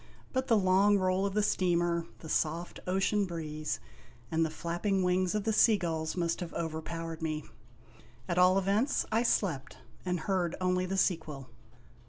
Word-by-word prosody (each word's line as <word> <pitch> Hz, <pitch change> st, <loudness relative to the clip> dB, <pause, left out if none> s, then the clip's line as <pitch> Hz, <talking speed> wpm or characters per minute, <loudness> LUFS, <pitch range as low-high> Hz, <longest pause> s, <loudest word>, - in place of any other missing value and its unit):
But 260 Hz, 0 st, 0 dB
the 230 Hz, -, +4 dB
long 195 Hz, +1 st, +4 dB
roll 185 Hz, +1 st, +1 dB
of 195 Hz, -, -5 dB
the 210 Hz, -, +3 dB
steamer, 175 Hz, -3 st, +1 dB
the 160 Hz, -, -9 dB
soft 165 Hz, +2 st, -1 dB
ocean 195 Hz, +2 st, +1 dB
breeze, 155 Hz, -, -4 dB, 0.5 s
and 160 Hz, 0 st, +2 dB
the 160 Hz, -, 0 dB
flapping 175 Hz, +5 st, -1 dB
wings 180 Hz, +1 st, +1 dB
of 210 Hz, -, 0 dB
the 220 Hz, -, 0 dB
sea 215 Hz, 0 st, +5 dB
gulls 160 Hz, -2 st, -3 dB
must 170 Hz, -1 st, 0 dB
have 175 Hz, -2 st, -6 dB
overpowered 165 Hz, 0 st, -4 dB
me. 155 Hz, -1 st, -2 dB, 0.8 s
At 175 Hz, -, 0 dB
all 185 Hz, +1 st, +6 dB
events, 200 Hz, +8 st, +1 dB
I 225 Hz, +1 st, +3 dB
slept, 165 Hz, -, 0 dB, 0.3 s
and 180 Hz, -2 st, -1 dB
heard 185 Hz, -4 st, 0 dB
only 185 Hz, 0 st, +1 dB
the 195 Hz, +1 st, -2 dB
sequel. 155 Hz, -9 st, -1 dB
180 Hz, 165 wpm, -31 LUFS, 165-195 Hz, 0.8 s, all